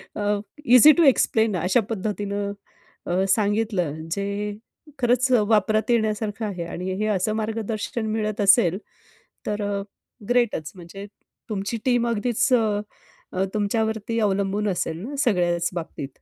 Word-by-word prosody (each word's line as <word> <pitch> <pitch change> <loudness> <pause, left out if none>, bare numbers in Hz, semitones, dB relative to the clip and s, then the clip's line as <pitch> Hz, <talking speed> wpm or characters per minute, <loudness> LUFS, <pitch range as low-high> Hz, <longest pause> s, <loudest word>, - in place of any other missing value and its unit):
A, 205 0 0 0.3
easy 250 +5 +8
to 340 - +5
explain 225 -6 +3
अशा 185 +8 +2
पद्धतीने 205 -1 -3 0.6
अ, 185 +2 +1
सांगितलं 205 -5 +1 0.2
जे 200 +3 -2 0.7
खरंच 250 +1 +2
अ, 235 - +5
वापरात 215 +2 +2
येण्यासारखं 220 -1 0
आहे 180 -4 -4
आणि 180 +2 -5
हे 215 - 0
असं 190 +4 0
मार्गदर्शन 220 +1 -3
मिळत 215 -1 -2
असेल, 190 -2 +5 0.7
तर 210 0 -2
अ, 200 -1 -2 0.5
ग्रेटच. 235 -11 +1
म्हणजे 190 +3 -10 0.4
तुमची 205 +2 -3
टीम 245 -2 +2
अगदीच 235 +3 0
अ, 210 -4 -2
तुमच्यावरती 220 +1 -1
अवलंबून 200 0 0
असेल 165 -3 -2
ना, 285 - -6
सगळ्याच 175 -6 +1
बाबतीत. 160 -5 -5
210 Hz, 125 wpm, -23 LUFS, 195-225 Hz, 0.7 s, easy